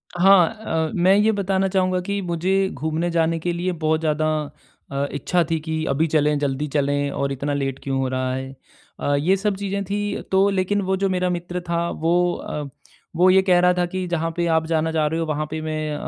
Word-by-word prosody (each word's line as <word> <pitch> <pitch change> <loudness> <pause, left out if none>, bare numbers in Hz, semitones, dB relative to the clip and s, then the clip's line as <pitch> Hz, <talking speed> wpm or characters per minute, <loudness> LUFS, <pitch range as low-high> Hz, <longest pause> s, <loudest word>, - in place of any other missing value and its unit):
हाँ 180 -1 +6
अ, 165 -8 -3
मैं 185 +2 +4
ये 210 +2 +4
बताना 195 -2 0
चाहूँगा 185 -1 +1
कि 200 +2 -3
मुझे 190 +2 0
घूमने 160 +3 -2
जाने 165 0 +1
के 175 +2 -2
लिए 175 +2 -1
बहुत 160 -2 0
ज़्यादा 155 -1 0 0.6
अ, 140 0 -1
इच्छा 175 +4 0
थी 165 -1 0
कि 160 0 -3
अभी 145 +4 +1
चलें, 150 -1 +2
जल्दी 145 +1 -1
चलें 145 0 +1
और 140 0 -2
इतना 140 +2 -2
लेट 135 -1 -2
क्यों 135 -1 -1
हो 135 - 0
रहा 130 0 -1
है। 130 +1 -5 0.4
अ, 145 - +1
ये 160 +7 +2
सब 205 +1 -1
चीज़ें 200 0 -3
थी 205 +2 -2
तो 195 +1 +4
लेकिन 195 +1 0
वो 190 0 0
जो 195 0 0
मेरा 180 -1 0
मित्र 175 0 -3
था 170 0 0
वो 175 +2 +1
अ, 150 - -5 0.5
वो 180 +3 +5
ये 190 +1 +6
कह 185 -2 +3
रहा 180 0 +4
था 180 0 0
कि 185 +1 -4
जहाँ 165 -1 -1
पे 175 - +1
आप 160 0 +1
जाना 160 0 0
जा 160 -1 +1
रहे 160 +2 -2
हो। 165 - -1
वहाँ 155 -1 -2
पे 160 - -3
अ, - - -7
मैं 155 -1 -3
170 Hz, 225 wpm, -22 LUFS, 155-185 Hz, 0.6 s, हाँ